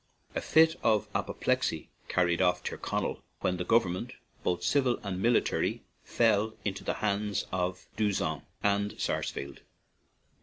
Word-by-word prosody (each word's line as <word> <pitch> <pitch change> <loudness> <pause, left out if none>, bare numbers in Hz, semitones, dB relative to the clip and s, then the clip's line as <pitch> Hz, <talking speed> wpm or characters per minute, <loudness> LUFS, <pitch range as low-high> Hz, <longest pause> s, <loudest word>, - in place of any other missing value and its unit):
A - - -1
fit 160 +1 +5
of 110 -2 +2
apoplexy - - -1 0.2
carried 85 -1 +2
off 90 -1 +2
Tyrconnell, - - -2 0.2
when 90 -1 +1
the 90 - -2
government, 95 -3 +1 0.3
both 90 - -1
civil 130 -4 +2
and 95 -2 -3
military, 120 +2 +2 0.2
fell 110 -1 +2
into 100 -2 -2
the - - -1
hands 105 0 0
of 90 0 -2
D'Usson 105 -2 0 0.2
and 100 0 +1
Sars - - -1
fleld. 70 0 -7
100 Hz, 130 wpm, -30 LUFS, 90-110 Hz, 0.3 s, fit